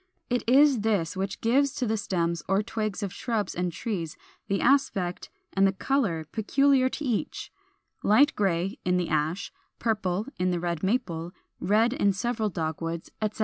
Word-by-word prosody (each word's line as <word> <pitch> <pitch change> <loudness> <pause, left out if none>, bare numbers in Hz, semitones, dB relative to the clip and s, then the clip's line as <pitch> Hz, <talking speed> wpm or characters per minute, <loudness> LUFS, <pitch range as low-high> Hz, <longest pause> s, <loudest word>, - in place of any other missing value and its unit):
It 245 - +1
is 275 0 +6
this 200 -6 0
which 190 +1 -3
gives 275 +5 +2
to 260 - -1
the 220 -1 +1
stems 170 -5 -1
or 195 +2 +2
twigs 215 -2 -3
of 195 -2 -3
shrubs 220 -5 -2
and 180 0 -1
trees 170 -2 -4 0.3
the 195 -1 0
aspect 220 -10 +1 0.2
and 195 0 +4
the 195 - +1
color 195 - 0
peculiar 260 +4 +3
to 300 - -5
each, 240 -5 -2 0.5
light 275 +8 +4
gray 190 -1 0
in 180 0 +2
the 175 -2 -1
Ash, 155 +5 -1 0.2
purple 210 -3 -1
in 180 0 +2
the 175 -1 0
Red 170 -2 -2
Maple, 175 -5 -1 0.3
red 220 +5 +3
in 200 -6 +2
several 220 +2 -1
Dogwoods, 165 -1 -4
etc. 215 0 -2
200 Hz, 165 wpm, -27 LUFS, 175-230 Hz, 0.5 s, is